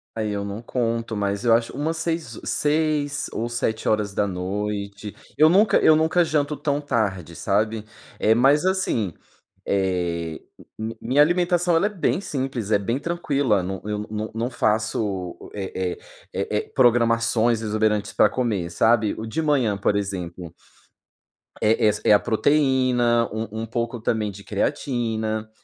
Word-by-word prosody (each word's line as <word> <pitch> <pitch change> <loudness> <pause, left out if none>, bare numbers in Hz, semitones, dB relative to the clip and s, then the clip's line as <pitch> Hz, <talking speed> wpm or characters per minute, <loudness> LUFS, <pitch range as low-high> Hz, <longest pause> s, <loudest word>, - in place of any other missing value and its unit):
Aí 110 -2 -2
eu 100 0 -2
não 100 +2 -5
conto 115 -2 -2
mas 100 +1 -1
eu 115 - +5
acho 115 0 +1
umas 160 +3 -1
seis 160 -7 -3
seis 150 -1 0
ou 115 - -2
19h 105 -2 -2 0.2
eu 155 - +7
nunca 195 +3 +5
eu 155 - +5
nunca 160 +3 +3
janto 150 -1 0
tão 145 0 -1
tarde 95 - -2
sabe, 105 +3 0 0.3
eh, 110 - +4
mas 140 +8 +4
assim, 185 - 0 0.5
eh, 90 -4 -1 0.6
minha 130 +5 +4
alimentação 175 +1 +2
ela 180 - +3
é - - +2
bem 195 -2 -1
simples, 130 - -3
é 105 - +4
bem 115 +6 -1
tranquila, 140 - 0
não 95 +1 -4
eu 105 0 -3
não 110 0 -4
não 115 +2 -2
faço 105 -6 -1 0.2
é 95 -2 -3
é - - -17 0.4
é 100 +2 -2
é - - +1
programações 115 -2 +3
exuberantes 105 -1 0
para - - +4
comer 105 -8 -2
sabe, 110 +4 +2
o 110 - -5
de 155 +9 -2
manhã 135 -10 +1
por 100 +1 +1
exemplo 90 -4 -4 1.1
É 110 +1 +3
essa 105 0 +1
é - - +5
a 105 - +6
proteína, 125 -2 +2
um 110 0 -4
um - - -3
pouco 115 +1 -3
também 110 -1 -1
de 100 +1 -12
creatina, 110 -2 -2
110 Hz, 145 wpm, -23 LUFS, 105-140 Hz, 1.1 s, eu